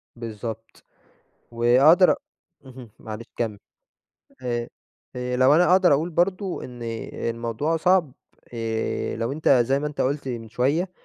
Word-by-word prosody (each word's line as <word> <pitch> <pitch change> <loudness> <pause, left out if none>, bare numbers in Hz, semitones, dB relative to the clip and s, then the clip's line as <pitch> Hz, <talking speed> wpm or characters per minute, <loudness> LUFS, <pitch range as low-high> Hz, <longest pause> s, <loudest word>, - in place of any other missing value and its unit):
بالضبط 115 -1 -8 0.7
وأقدر 130 +10 +5
أ - - +2 0.5
اهم، 125 -3 -12
معلش 110 +1 -8
كمّل. 110 -3 -2 0.9
ه 120 -1 -2 0.5
هي 125 0 -3
لو 130 +3 +5
أنا 180 +2 +4
أقدر 185 -4 +5
اقول 160 +5 +1
برضه 185 +3 -1
إن 125 -1 -9 0.3
الموضوع 115 +7 -2
صعب 175 -4 +2 0.4
آآ، 115 -1 -2
لو 115 +3 -2
أنت 155 +2 -1
زي 135 +1 +4
ما 150 - -3
أنت 150 -1 -5
قُلت 135 0 -1
من 115 -2 -5
شوية، 145 - 0
125 Hz, 135 wpm, -24 LUFS, 115-155 Hz, 0.9 s, وأقدر